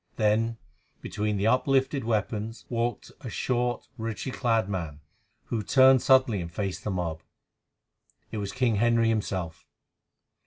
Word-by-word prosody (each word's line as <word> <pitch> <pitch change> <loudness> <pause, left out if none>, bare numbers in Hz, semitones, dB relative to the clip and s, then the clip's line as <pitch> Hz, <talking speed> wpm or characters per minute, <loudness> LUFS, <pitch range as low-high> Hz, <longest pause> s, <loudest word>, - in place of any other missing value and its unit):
Then 115 +2 +1 0.4
between 105 0 -2
the 100 - 0
uplifted 135 +3 +2
weapons 110 0 -2
walked 120 0 -2
a 125 - -6
short, 120 0 -1
richly 115 +2 -4
clad 115 -5 +1
man, 80 -7 -4 0.4
who 115 - -3
turned 130 +4 +5
suddenly 130 -7 +4
and 85 -1 -6
faced 95 +1 -4
the - - -3
mob. 85 -4 -3 1.1
It - - -4
was 100 -1 -3
King 120 -1 +1
Henry 115 +1 +3
himself. 95 -7 -3
110 Hz, 130 wpm, -27 LUFS, 100-120 Hz, 1.1 s, turned